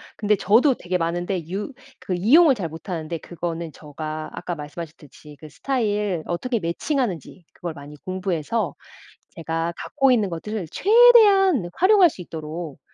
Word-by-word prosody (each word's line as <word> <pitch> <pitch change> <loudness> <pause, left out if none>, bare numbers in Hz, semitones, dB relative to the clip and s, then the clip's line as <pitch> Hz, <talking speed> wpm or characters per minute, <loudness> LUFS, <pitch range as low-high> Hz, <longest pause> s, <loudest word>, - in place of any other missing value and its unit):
근데 210 0 +1
저도 240 +9 +4
되게 180 -2 -2
많은데 175 0 -3
유 205 +8 -4 0.3
그 185 - -4
이용을 270 - +5
잘 180 -8 -4
못하는데 165 0 -5
그거는 170 0 -5
제가 155 +1 -7
아까 175 - -5
말씀하셨듯이 150 -1 -10
그 155 - -11
스타일 210 - -1
어떻게 230 +8 -2
매칭하는지 185 - -3
그걸 170 -2 -6
많이 145 0 -11
공부해서 185 0 -2 0.5
제가 165 +1 -3
갖고 270 -2 +1
있는 215 -6 +2
것들을 185 +2 -5
최대한 405 - +5
활용할 375 -1 +5
수 195 - -10
있도록. 160 -2 -7
180 Hz, 330 characters per minute, -23 LUFS, 165-235 Hz, 0.5 s, 이용을